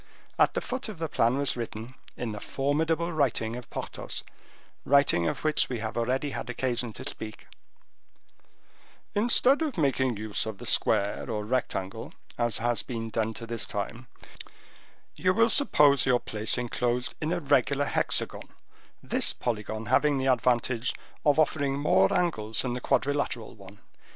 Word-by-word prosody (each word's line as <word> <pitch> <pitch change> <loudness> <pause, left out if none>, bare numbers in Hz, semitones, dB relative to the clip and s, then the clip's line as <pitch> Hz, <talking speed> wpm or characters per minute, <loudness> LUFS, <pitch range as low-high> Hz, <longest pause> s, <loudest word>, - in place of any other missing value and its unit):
At - - +4
the - - 0
foot 255 -2 -4
of 210 - -7
the 165 0 -2
plan 120 -3 +2
was 140 0 0
written, 115 0 -6 0.2
in 120 -2 -3
the 105 - -6
formidable 160 +7 0
writing 120 -6 0
of 125 -1 -8
Porthos, - - -6 0.6
writing 140 -12 +4
of - - -3
which 155 0 +2
we 125 - -2
have 110 0 -4
already 130 +5 0
had - - -5
occasion 125 -1 -1
to - - -6
speak:— 110 0 -7 1.7
"Instead 245 +6 +4
of 305 -8 -2
making 130 -6 +1
use 110 0 -3
of 110 -2 -5
the - - -9
square 100 +4 +1
or 105 -2 -2
rectangle, 105 -5 -3 0.2
as 120 -2 0
has 120 -1 0
been 115 -3 -5
done 110 0 -1
to 115 - -7
this 115 -1 -3
time, 115 +4 -5 1.1
you 185 0 +1
will 230 +1 +4
suppose 145 - +4
your 125 -1 +4
place 110 +1 -1
inclosed 125 0 -1
in 155 +1 -1
a 175 - 0
regular 140 -1 +2
hexagon, - - 0 0.5
this - - +2
polygon 110 -1 -3
having 140 +5 +3
the 130 - -1
advantage 125 -1 +1 0.3
of 145 -1 +4
offering 140 -3 +1
more 140 -9 +3
angles 110 -12 0
than 125 -2 -2
the 125 - -4
quadrilateral 130 -6 0
one. 100 -2 -14
125 Hz, 155 wpm, -28 LUFS, 115-145 Hz, 1.7 s, At